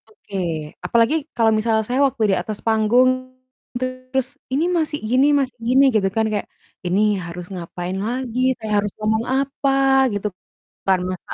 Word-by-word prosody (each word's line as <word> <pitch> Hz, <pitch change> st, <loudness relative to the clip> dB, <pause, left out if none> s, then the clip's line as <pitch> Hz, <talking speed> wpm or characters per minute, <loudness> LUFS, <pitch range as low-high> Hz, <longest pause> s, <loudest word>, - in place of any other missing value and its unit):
Oke. 205 Hz, -2 st, -9 dB, 0.5 s
Apalagi 235 Hz, +5 st, +3 dB, 0.2 s
kalau 225 Hz, -2 st, +3 dB
misalnya 220 Hz, 0 st, +1 dB
saya 250 Hz, +5 st, 0 dB
waktu 240 Hz, -4 st, -3 dB
di -, -, +3 dB
atas, 215 Hz, -2 st, -6 dB
panggung 225 Hz, +3 st, +4 dB, 0.7 s
terus, 255 Hz, +1 st, -2 dB, 0.2 s
"Ini 285 Hz, +6 st, +1 dB
Mas, 320 Hz, -3 st, 0 dB, 0.2 s
gini 260 Hz, +4 st, +4 dB
Mas, 270 Hz, -2 st, 0 dB, 0.2 s
gini," 260 Hz, +3 st, +5 dB
gitu 200 Hz, -3 st, +3 dB
kan 220 Hz, +2 st, +1 dB
kayak, 205 Hz, -1 st, -2 dB, 0.4 s
ini 180 Hz, +3 st, +2 dB, 0.2 s
harus 175 Hz, +1 st, -7 dB
ngapain 175 Hz, +1 st, -5 dB
lagi, 250 Hz, 0 st, -3 dB, 0.2 s
saya 220 Hz, -1 st, -5 dB
harus 205 Hz, -, -3 dB
ngomong 220 Hz, +1 st, +1 dB
apa 275 Hz, 0 st, -1 dB, 0.4 s
gitu, 205 Hz, +1 st, -2 dB, 0.6 s
karena 185 Hz, -1 st, +2 dB
ka -, -, -6 dB
225 Hz, 155 wpm, -21 LUFS, 205-255 Hz, 0.7 s, gini